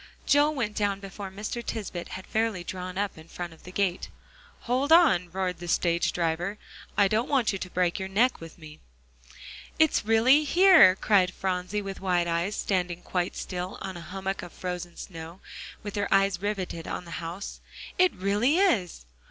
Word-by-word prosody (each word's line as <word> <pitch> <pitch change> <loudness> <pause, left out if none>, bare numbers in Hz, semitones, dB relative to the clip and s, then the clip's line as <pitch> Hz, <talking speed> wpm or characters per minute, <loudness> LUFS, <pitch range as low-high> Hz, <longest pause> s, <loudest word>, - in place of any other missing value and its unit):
Joel 295 +2 +4
was 240 -6 0
down 205 -2 -1
before 195 0 -7
Mr. 210 +5 -5
Tisbett 195 -7 -5
had 185 - -8
fairly 220 -5 -1
drawn 185 +1 -6
up 200 -5 -2
in 160 - -14
front 175 -1 -7
of 160 - -19
the 180 - -9
gate. 185 -2 -1 0.5
"Hold 260 +5 0
on," 270 - +5
roared 185 -1 -2
the 175 - -7
stage 170 0 +1
driver, 175 +4 -1 0.4
"I 200 - +5
don't 220 +5 0
want 260 -7 +2
you 195 - -3
to 185 - -5
break 180 +1 0
your 190 - -3
neck 230 +4 +2
with 165 -1 -10
me." 155 -2 -12 1.0
"It's 315 -1 +3
really 230 +7 +5
here!" 340 - +7
cried 190 -2 +3
Phronsie 190 +2 -2
with 195 -1 -6
wide 180 -2 +1
eyes, 170 +5 -1
standing 180 -2 -1
quite 180 -1 -2
still 180 0 -5
on 190 -1 -6
a 175 - -7
hummock 190 +2 -4
of 175 - -10
frozen 180 -1 -5
snow, 165 0 -9 0.4
with 205 -1 -6
her 205 -1 -2
eyes 195 -2 +3
riveted 190 -5 -3
on 180 - -4
the 170 - -11
house. 170 +4 -6 0.4
"It 365 0 +5
really 205 - +2
is!" 215 - +1
190 Hz, 180 wpm, -27 LUFS, 175-215 Hz, 1.0 s, here